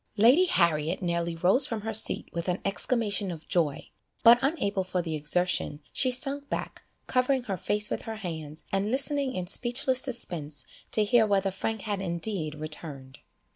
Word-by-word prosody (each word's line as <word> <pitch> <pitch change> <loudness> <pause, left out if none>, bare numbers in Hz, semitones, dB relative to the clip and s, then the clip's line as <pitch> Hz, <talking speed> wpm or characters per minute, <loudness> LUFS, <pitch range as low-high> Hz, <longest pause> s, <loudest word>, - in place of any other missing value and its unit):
Lady 250 - +6
Harriet 170 - +1
nearly 170 -1 -1
rose 185 - +5
from 225 -2 -4
her 220 +1 -4
seat 220 - +3
with 170 +1 -4
an 180 0 0
exclamation 205 -1 +1
of 165 -2 -8
joy, 155 -6 -1 0.4
but 235 +1 +8
unable 235 - -1
for 185 0 -3
the 165 -2 -3
exertion, 155 0 -1
she 260 - +2
sunk 275 +3 -2
back, - - -5 0.2
covering 255 0 +1
her 200 -5 -3
face 210 +3 -1
with - - -2
her 225 - -6
hands, 160 -6 -7
and 195 +2 0
listening 275 +1 +1
in 185 - -3
speechless 250 +6 +1
suspense 170 - -2 0.3
to 215 - +4
hear 220 +1 +3
whether 195 -1 +1
Frank 220 +2 -4
had 205 -2 -3
indeed 170 -3 -2
returned. 150 -3 -5
195 Hz, 170 wpm, -27 LUFS, 170-240 Hz, 0.4 s, but